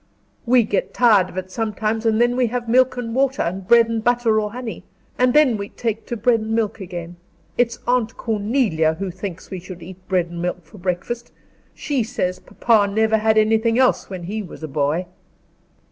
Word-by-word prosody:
"We 245 0 +5
get 205 -2 -2
tired 210 -7 +4
of - - -11
it 185 0 -5
sometimes 220 +1 -1
and 220 0 +2
then 240 +1 +3
we 250 -1 +2
have 240 +1 -3
milk 255 +2 +3
and 230 -2 -4
water, 270 +1 +1
and 185 +2 -4
bread 235 +1 +6
and 225 -1 -2
butter, 235 -2 +2
or 210 0 -3
honey; 245 0 -6 0.4
and 250 0 +4
then 275 -5 +4
we 200 0 -5
take 225 -2 -4
to 240 - -3
bread 230 +2 +3
and 220 +1 -2
milk 220 -1 -1
again. 175 -1 -7 0.4
It's 240 -1 +1
Aunt 245 -2 0
Cornelia 210 - +1
who 195 +1 -4
thinks 185 0 -7
we 190 - -4
should 175 -1 -10
eat 180 +2 -10
bread 180 -2 +1
and 170 0 -7
milk 180 -1 -3
for 175 +6 -15
breakfast. 190 +7 -3 0.4
She 280 -4 -1
says 215 -6 -2
papa 210 -4 +2
never 220 +1 +2
had 220 0 +2
anything 220 +2 +3
else 260 0 +2
when 185 -3 -6
he 210 +5 -4
was 180 -4 -10
a - - -3
boy." 150 +4 0
220 Hz, 200 wpm, -21 LUFS, 185-240 Hz, 0.4 s, bread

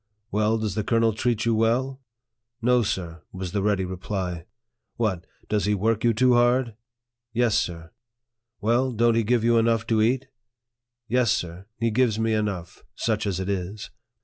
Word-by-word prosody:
" 105 +2 -49
Well, 110 +2 +2
does 110 -3 -2
the 110 - -1
colonel 115 +1 +2
treat 115 0 0
you 115 - +3
well? 125 +5 +1 0.2
" 115 -1 -60
" 120 +1 -55
No, 125 -1 +5
sir," 85 -5 -3
was 95 -1 -5
the 100 - -1
ready 100 -2 +1
reply. 90 -2 -4 0.3
" 120 - -57
What, 105 -7 -1 0.2
does 105 -1 0
he 105 0 +2
work 110 +2 0
you 120 - +4
too 125 +3 +3
hard? 120 0 +3 0.2
" 120 0 -62
" 120 0 -59
Yes, 115 -3 +3
sir." 85 -6 -2 0.3
" 115 0 -54
Well, 120 +4 +2
don't 115 +1 +3
he 115 - +3
give 120 +1 +1
you 115 0 +4
enough 115 0 +2
to 110 -2 +2
eat? 125 +4 +2 0.3
" 120 0 -62
" 120 0 -62
Yes, 125 -1 +2
sir, 90 +3 -3
he 115 0 0
gives 115 -1 +2
me 110 0 +1
enough, 100 -6 -3
such 110 -2 -1
as 95 -2 -1
it 95 - -3
is." 100 +1 -4
115 Hz, 205 wpm, -25 LUFS, 100-120 Hz, 0.3 s, No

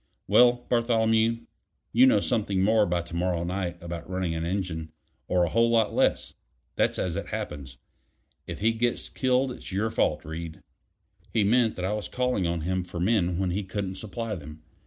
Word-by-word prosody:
Well, 120 0 +5
Bartholomew, 115 -1 +2 0.5
you'll 130 +3 +7
know 105 - +3
something 100 -5 0
more 110 0 +4
by 85 -1 0
to 85 0 -9
morrow 85 -1 0
night 90 0 -3
about 85 -1 -6
running 90 -2 -1
an 80 0 -3
engine, 85 -3 -3 0.4
or 90 -1 +2
a 85 - +1
whole 115 +5 +3
lot 115 -2 +2
less: - - +1 0.4
that's - - +1
as 90 -2 -2
it 100 - -4
happens. 75 -11 -6 0.7
If - - -6
he 110 +2 +4
gets 120 +1 -1
killed, 130 0 +1
it's 125 - -9
your 105 +4 0
fault, 75 -8 0
Reed." 80 +1 -7 0.7
He 110 - +2
meant 115 +2 +3
that 90 - -3
I 100 - 0
was 105 -1 -4
calling 125 -8 0
on 85 -1 -1
him 90 +3 -1
for 90 -1 -7
men 90 -2 +1
when 95 -1 0
he 100 +4 -1
couldn't 95 0 -4
supply 110 +3 -5
them. 75 -3 -9
95 Hz, 185 wpm, -27 LUFS, 85-115 Hz, 0.7 s, you'll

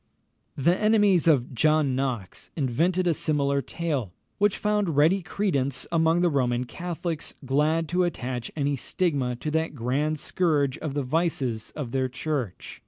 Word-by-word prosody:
] - - -41
The 170 +6 +3
enemies 205 -5 +3
of 135 -6 +3
John 150 0 +2
Knox 125 -8 -3
invented 165 +7 +1
a 170 - +3
similar 140 -3 0
tale, 140 - -3 0.3
which 205 -1 +3
found 210 -6 0
ready 165 +7 +4
credence 140 -8 -1
among 165 +1 +3
the 175 - +4
Roman 125 -3 +1
Catholics, 170 +3 -4
glad 155 +5 +1
to 180 +1 +2
attach 125 -8 -3
any 145 -1 0
stigma 140 -4 -1
to 150 +5 -4
that 160 -1 -1
grand 145 +5 -1
scourge 145 -7 0
of 150 -3 -4
the 145 - 0
vices 130 -6 -1
of 140 -6 -5
their 130 0 0
Church. 130 - -4
150 Hz, 155 wpm, -26 LUFS, 130-170 Hz, 0.3 s, ready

